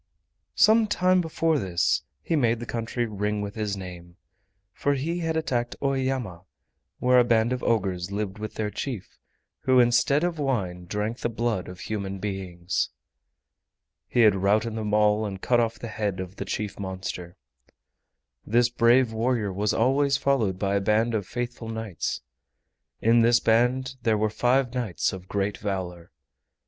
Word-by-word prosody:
Some 220 +1 +5
time 185 -2 +3
before 160 -2 +1
this 90 -3 +1 0.2
he 165 - 0
made 120 -5 +2
the 120 - -5
country 115 +1 -2
ring 105 -1 -2
with 100 0 -4
his 105 -2 -2
name, 90 -2 -9 0.6
for 145 +6 0
he 165 +6 -2
had 165 -1 -1
attacked 120 -6 -1
Oeyama, 130 -9 -1 0.6
where 125 0 +4
a - - +6
band 115 0 +2
of 125 - -3
ogres 95 -5 0
lived 100 0 -3
with 110 0 -6
their 105 -1 -2
chief, 120 -6 -6 0.4
who 130 -1 +3
instead 125 +5 +4
of 175 -2 -1
wine 95 -11 -1
drank 105 +6 -3
the - - -1
blood 115 -4 -1
of 90 0 -9
human 100 0 -4
beings. 95 -3 -3 1.2
He 120 - +2
had 110 -3 +7
routed 105 +4 +1
them 110 -1 -3
all 105 0 +3
and 100 -3 -4
cut 120 +5 +2
off 115 -1 0
the 115 - -7
head 105 -4 -2
of 95 +1 -6
the - - -4
chief 105 -2 -4
monster. 95 -2 -5 1.1
This 120 +2 +3
brave 120 0 +4
warrior 110 -3 0
was 105 +2 0
always 135 +4 +2
followed 120 -10 +1
by 100 +1 0
a - - 0
band 110 +4 +2
of 105 -4 -1
faithful 120 -1 -5
knights. 110 -7 -3 0.8
In 115 +1 +5
this 120 +1 +5
band 125 +4 +2
there 110 -2 +2
were 105 0 0
five 125 +2 +2
knights 120 -9 -1
of 95 -1 -8
great 100 0 -2
valor. 90 -4 -4
110 Hz, 160 wpm, -26 LUFS, 100-125 Hz, 1.2 s, had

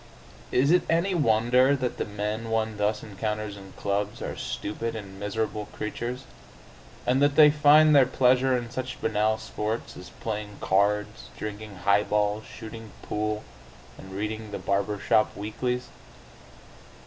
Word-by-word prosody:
Is 140 +4 +3
it 180 - +5
any 170 +4 +2
wonder 125 -1 +4
that 130 -2 -2
the - - -1
men 105 +2 -3
one 110 -1 -1
thus 105 +1 0
encounters 105 0 -4
in 95 -1 -12
clubs 105 +3 -2
are - - -4
stupid 115 +2 -4
and 100 -3 -8
miserable 105 +1 -2
creatures, 120 +4 -5 0.8
and 130 +3 +2
that 145 0 +3
they 150 -1 +8
find 150 +1 +6
their 135 -3 +7
pleasure 130 0 +3
in 120 -1 -6
such 130 +1 -5
banal 110 0 +1
sports 110 +1 -4
as 90 - -10
playing 105 -2 -5
cards, 105 +2 0
drinking 105 -1 -6
highballs, 105 +1 +2
shooting 110 -1 -10
pool, 105 0 -2 0.5
and 95 0 -11
reading 110 +2 -4
the 105 - -4
barber 100 +1 -1
shop 110 +2 +2
weeklies?... 125 +4 -3
110 Hz, 140 wpm, -27 LUFS, 105-125 Hz, 0.8 s, they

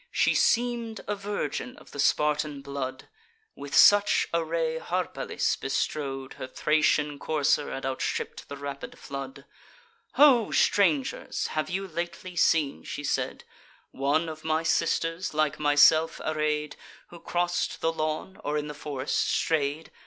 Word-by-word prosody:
She - - +2
seem'd 235 -2 +1
a - - 0
virgin 205 +5 -4
of - - -16
the 145 - -9
Spartan 150 -1 +1
blood: 135 -2 -5 0.5
With 140 -1 -6
such 205 0 +6
array 165 -1 0
Harpalyce 180 +2 -1
bestrode 135 -3 -3
Her - - -5
Thracian 150 0 +1
courser 150 -1 +1
and 135 - -5
outstripp'd 135 -1 -3
the 140 - -6
rapid 140 0 -7
flood. 135 -1 -7 0.7
"Ho, 260 -7 +6
strangers! 160 -10 +1
have 155 - -1
you 195 +2 -3
lately 175 +1 -5
seen," 155 -5 +2
she 145 - -6
said, - - -2 0.5
"One 145 +5 0
of 155 -1 -7
my 160 0 0
sisters, 165 +1 0
like 155 -1 +1
myself 150 +2 +5
array'd, 150 -1 -1 0.3
Who 170 - -12
cross'd 175 +1 -1
the 165 0 +1
lawn, 155 +4 -3
or 150 +1 -1
in 150 - -2
the - - -5
forest 145 -2 -2
stray'd? 155 0 0
155 Hz, 135 wpm, -27 LUFS, 145-170 Hz, 0.7 s, such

